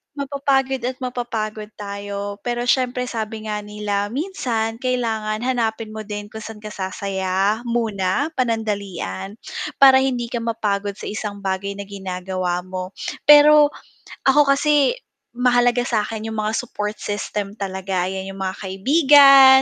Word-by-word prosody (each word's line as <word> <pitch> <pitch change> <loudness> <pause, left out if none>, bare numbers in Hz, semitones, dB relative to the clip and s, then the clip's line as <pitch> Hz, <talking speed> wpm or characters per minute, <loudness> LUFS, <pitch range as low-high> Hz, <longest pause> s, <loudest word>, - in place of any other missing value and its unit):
Mapapagod 275 -1 0
at 255 - -3
mapapagod 220 -4 -3
tayo 200 0 -5
pero 240 0 -1
siyempre 250 0 +1
sabi 220 -2 -5
nga 210 - -2
nila 205 -1 -3
minsan 235 - -2
kailangan 225 -3 -1
hanapin 225 -3 -1
mo 215 -1 -7
din 210 0 -6
kung 220 - -7
saan 220 -1 -9
ka 210 - -7
sasaya, 190 +1 -1
muna, 225 - 0
panandalian 205 - -2 0.5
para 265 -1 +9
hindi 250 -3 -1
ka 240 - -1
mapagod 205 -3 -2
sa - - -12
isang 205 -1 -5
bagay 195 +1 -2
na 200 - -6
ginagawa 185 -2 -3
mo 185 +1 -6 0.3
pero 295 0 +8 0.6
ako 275 0 +5
kasi, 295 - +3 0.4
mahalaga 245 0 +2
sa'kin 220 -1 -2
yung 220 - -5
mga 215 - 0
support 215 -4 -3
system 205 0 -4
talaga 190 -2 -2
yan 190 +1 -4
yung 195 - -5
mga 190 +1 -2
kaibigan, 270 - +7
220 Hz, 135 wpm, -21 LUFS, 200-250 Hz, 0.6 s, para